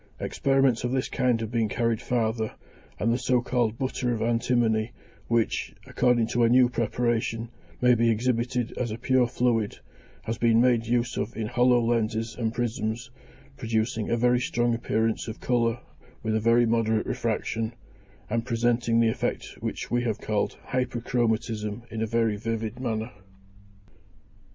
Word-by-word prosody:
Experiments 135 -4 +1
of 120 - 0
this 130 -1 0
kind 125 -3 +1
have 110 -1 -4
been 115 -2 +1
carried 115 0 0
farther, 110 -2 -1 0.4
and 115 +2 +1
the 120 - 0
so 125 -1 +2
called 120 -2 0
butter 130 -1 -1
of 115 - -1
antimony, 115 -1 +1 0.3
which, 115 -1 0
according 120 -2 +2
to 120 +2 -1
a 115 - +5
new 125 +1 +6
preparation, 115 -1 -1 0.3
may 125 0 +6
be 115 0 +3
exhibited 120 +1 0
as 120 - -1
a 110 - -4
pure 125 0 +2
fluid, 120 -3 0 0.5
has 115 - -4
been 115 -1 +4
made 120 -2 +3
use 120 0 0
of 110 +3 -3
in 110 - -2
hollow 125 +2 +3
lenses 115 -1 0
and 115 -2 -1
prisms, 120 +1 -3 0.5
producing 110 -2 -1
a 120 - +1
very 125 +1 +3
strong 120 -1 0
appearance 115 -1 -1
of 110 - -6
colour 120 -1 +1 0.4
with 110 0 0
a - - +2
very 115 +2 +4
moderate 110 -1 +1
refraction, 115 0 -2 0.6
and 115 +1 -1
presenting 115 -1 +1
the 115 -1 +4
effect - - -2
which - - -4
we 120 0 +2
have 115 -3 -1
called 105 -1 -2
hyperchromatism 115 -3 -1
in 110 - -4
a 110 - 0
very 115 -1 +1
vivid 115 +1 -3
manner. 115 -2 -2
115 Hz, 155 wpm, -26 LUFS, 110-120 Hz, 0.6 s, new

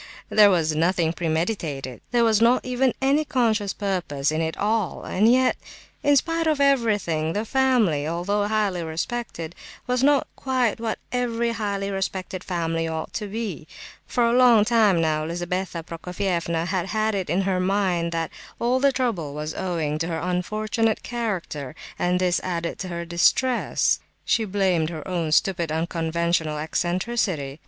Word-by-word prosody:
There 210 -1 +7
was 160 -5 +1
nothing 165 0 +1
premeditated, 160 - -2
there 240 -1 +3
was 225 -1 +3
not 240 +2 +4
even 255 +1 +2
any 280 +3 +3
conscious 225 -8 +1
purpose 175 -9 -1
in 155 +1 -1
it 160 0 -2
all, 215 -2 -1
and 215 +5 +3
yet, 255 +1 +3 0.4
in 290 0 +4
spite 330 +3 +1
of 305 -2 +2
everything, 210 - +2
the 210 +2 -2
family, 225 - +2
although 200 +5 0
highly 210 -4 0
respected, 165 0 -4 0.3
was 250 -1 0
not 280 0 +4
quite 255 -4 0
what 225 -1 -2
every 235 -1 0
highly 200 -3 -2
respected 190 -1 -3
family 165 -2 -1
ought 160 -1 -4
to 210 - -3
be. 200 -7 -5 0.4
For 240 - +1
a 235 - +2
long 240 -4 +6
time 215 -6 +4
now 155 -1 +1
Lizabetha 175 +1 -3
Prokofievna 170 0 -2
had 185 0 -1
had 215 +1 0
it 190 -5 -2
in 180 +5 +2
her 190 -1 0
mind 185 -3 +1
that 165 -1 -2 0.3
all 245 +2 +1
the 280 +1 +4
trouble 220 - -2
was 150 +1 -4
owing 160 -5 -2
to 165 - -1
her 165 -2 -2
"unfortunate 215 +6 -1
character," 185 - -4 0.2
and 180 +1 +1
this 180 -1 +2
added 170 -2 -3
to 190 - -4
her 170 -1 -4
distress. 205 +9 +2 0.3
She 225 - +2
blamed 185 -5 +1
her 160 +1 -7
own 170 -4 -1
stupid 170 0 +2
unconventional 165 -1 -1
"eccentricity." 175 -2 -1
185 Hz, 155 wpm, -24 LUFS, 165-225 Hz, 0.4 s, There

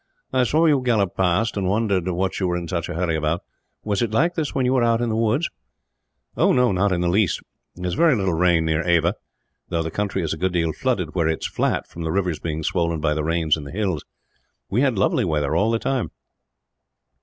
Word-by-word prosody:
"I 130 -1 +3
saw 155 +7 +2
you 145 -4 +4
gallop 110 -7 +1
past, 95 +5 +1
and 100 -2 -1
wondered 100 -4 +1
what 95 +1 -1
you 95 - 0
were 90 0 0
in 85 -1 -5
such 85 -1 -3
a 90 - -4
hurry 85 -1 0
about. 80 +2 -1 0.4
Was 105 0 -1
it 120 - +1
like 150 +11 +2
this 160 -4 -3
when 130 - +1
you 125 - +2
were 130 - +3
out 115 -1 +3
in 120 -1 -1
the 110 - -1
woods?" 115 +8 +1 0.9
"Not 100 -6 +3
in 90 -1 0
the 90 - +1
least. 95 0 +1 0.3
There 90 - -7
is 90 - -1
very 160 - +4
little 95 -5 0
rain 85 -1 +3
near 80 0 +1
Ava; 85 +1 +2 0.6
though 85 -1 0
the 80 - -4
country 100 0 -2
is 80 - -1
a - - -5
good 95 +2 -1
deal 85 -2 0
flooded, 95 -12 -1
where 85 -4 +1
it 80 0 -1
is - - 0
flat, - - -1
from 85 - -10
the 80 -1 -2
rivers 90 -4 -1
being 80 -1 -4
swollen 85 -1 0
by 75 -1 +1
the 75 0 -2
rains 80 -1 +1
in 75 - -7
the 70 - -8
hills. 95 -6 -2 0.7
We 115 - +2
had 130 -6 +2
lovely 95 - +2
weather, 75 -3 0
all 105 +6 +2
the 115 - +2
time." 130 +1 -1
90 Hz, 235 wpm, -22 LUFS, 85-115 Hz, 0.9 s, you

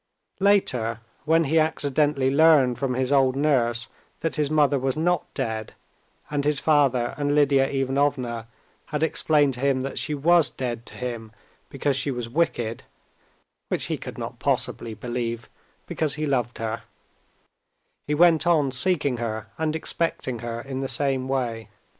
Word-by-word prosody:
Later, 125 - +2 0.3
when 165 +1 +4
he 160 +2 +2
accidentally 145 -3 +1
learned 140 -5 +4
from 130 -1 -1
his 130 +1 0
old 135 -2 +3
nurse 120 -5 +1 0.3
that 165 -5 -1
his 150 -2 0
mother 145 -2 +3
was 135 +2 -1
not 175 +1 0
dead, 110 -5 -3 0.6
and 145 -1 0
his 145 -1 +1
father 135 -6 +2
and 145 0 +1
Lidia 140 -2 +4
Ivanovna 135 -4 -1 0.4
had 150 0 -2
explained 150 -3 +2
to 120 - -6
him 135 -1 +1
that 135 +1 -3
she 150 - -2
was 165 +1 +4
dead 120 -2 -5
to - - -11
him 120 -3 -5 0.4
because 140 0 -1
she 135 +2 0
was 120 -3 -3
wicked 120 -5 -1 0.9
(which - - -1
he - - -2
could - - -8
not - - -6
possibly 115 -2 -1
believe, 120 -1 -4 0.4
because 150 -2 -2
he 155 0 -2
loved 125 -4 -1
her), 115 0 -3 1.3
he 150 - 0
went 170 0 +5
on 150 -6 +3
seeking 140 -2 +1
her 110 -2 -4
and 160 -1 0
expecting 160 -6 -1
her 115 0 -5
in 135 0 -5
the 135 - -2
same 135 -2 0
way. 120 -5 -2
135 Hz, 155 wpm, -24 LUFS, 120-150 Hz, 1.3 s, went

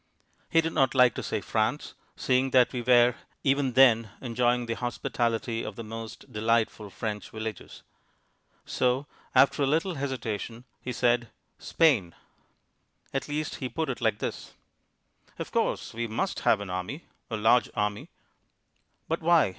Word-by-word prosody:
He 165 - +4
did 165 0 -3
not 135 -1 +2
like 125 -2 +6
to - - -4
say - - -2
"France," - - -1 0.2
seeing 130 +1 +1
that 125 0 +4
we 125 - -2
were 120 0 +5 0.3
even 135 -2 +2
then 115 -4 +5
enjoying 120 0 +1
the 115 - -2
hospitality 115 -1 -2
of - - -6
the 115 - -6
most 115 +3 -9
delightful 110 -1 0
French 105 +1 -5
villages. 110 -3 -7 0.8
So, 125 +3 0 0.3
after 135 +2 +5
a 140 - +3
little 165 +6 +1
hesitation, 120 -5 -4 0.2
he 125 - -4
said 120 -1 +2 0.3
"Spain." 130 - +2 1.0
At 135 - -2
least 150 +1 -3
he 130 - -4
put 160 +1 -2
it 125 - -4
like 110 -3 +1
this: - - -5 0.8
"Of - - -6
course, - - -1
we 115 +1 -3
must 115 - -2
have 105 - +3
an 100 -3 -6
army, 90 - -4 0.3
a 110 - -2
large 115 +3 +4
army." 105 0 -2 1.0
"But 165 +1 -1
why?" 165 - +4
120 Hz, 150 wpm, -28 LUFS, 115-135 Hz, 1.0 s, like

